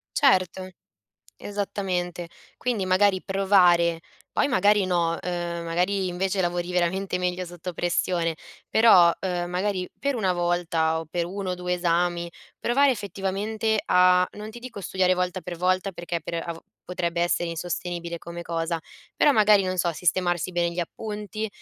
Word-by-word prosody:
Certo. 185 - +2 0.7
Esattamente. 185 -4 -3 0.3
Quindi 230 -6 -1
magari 185 0 +3
provare, 180 -4 +3 0.3
poi - - +1
magari 205 -3 +4
no, 170 -2 +1
ehm, 175 -1 -3
magari 185 +3 0
invece 190 +2 -1
lavori 175 0 -1
veramente 180 +2 0
meglio 180 0 -2
sotto 175 +1 -7
pressione. 170 -1 0 0.3
Però, 190 -7 +7
uhm, 175 -2 -2
magari 185 0 -1
per 280 -1 0
una 195 -5 +1
volta 170 -2 0
o 165 - -7
per 170 +2 -2
1 190 0 -4
o - - -2
2 180 0 -2
esami, 175 0 0 0.3
provare 275 +3 +3
effettivamente 210 +1 -2
a, 180 0 +5
non 210 +1 -7
ti 240 - -10
dico 240 -5 -8
studiare 185 +1 +2
volta 180 0 -1
per 175 +1 -6
volta 185 +2 +1
perché 170 0 -4
per 170 - -5
av 165 -1 -5 0.2
potrebbe 170 -1 -2
essere 175 0 +1
insostenibile 170 0 -4
come 170 +1 -8
cosa, 165 0 -2 0.4
però 295 - +5
magari 210 -4 +5
non 185 0 -2
so, 170 0 +1
sistemarsi 175 +1 0
bene 170 -1 0
gli 175 - -4
appunti, 210 +3 -4
180 Hz, 150 wpm, -25 LUFS, 175-195 Hz, 0.7 s, Però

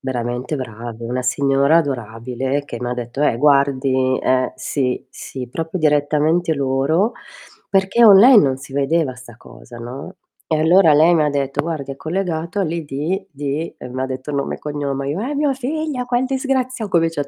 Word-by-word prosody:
veramente 125 +1 -3
bravi. 115 -2 -7
Una 125 +2 -2
signora 140 +3 +2
adorabile 130 0 -3
che 120 - -7
m'ha 125 0 -2
detto 120 +3 -4
"Eh, 150 - +2
guardi" 135 -2 +2
eh, 130 -1 +1
sì, 130 -1 -2
sì, 130 -2 -8
proprio 165 +6 -4
direttamente 155 +2 +2
loro, 140 - +1 0.6
perché 195 +5 +3
online 215 - +8
non 135 -2 +1
si 135 0 -12
vedeva 140 0 0
'sta 125 -3 -14
cosa, 120 0 -14
no, 130 +10 -8 0.3
e 160 - 0
allora 165 +1 +5
lei 160 +4 +5
m'ha 155 -3 +3
detto: 140 -1 -1
"Guardi 150 -4 -4
è - - -11
collegato 170 +2 -3
all'ID 165 +2 -3
di" 145 +2 -4
e 125 - -8
m'ha 130 +1 -3
detto 130 +2 -6
nome 140 -1 -2
e - - -19
cognome. 140 -2 -3
Io: 165 +7 -3
"È 275 +6 -3
mio 290 -1 +1
figlio, 275 0 -3
che 245 +1 +1
disgrazia" 260 -4 -2
Co 175 - +3
vece 165 -3 -1
145 Hz, 165 wpm, -19 LUFS, 130-170 Hz, 0.6 s, online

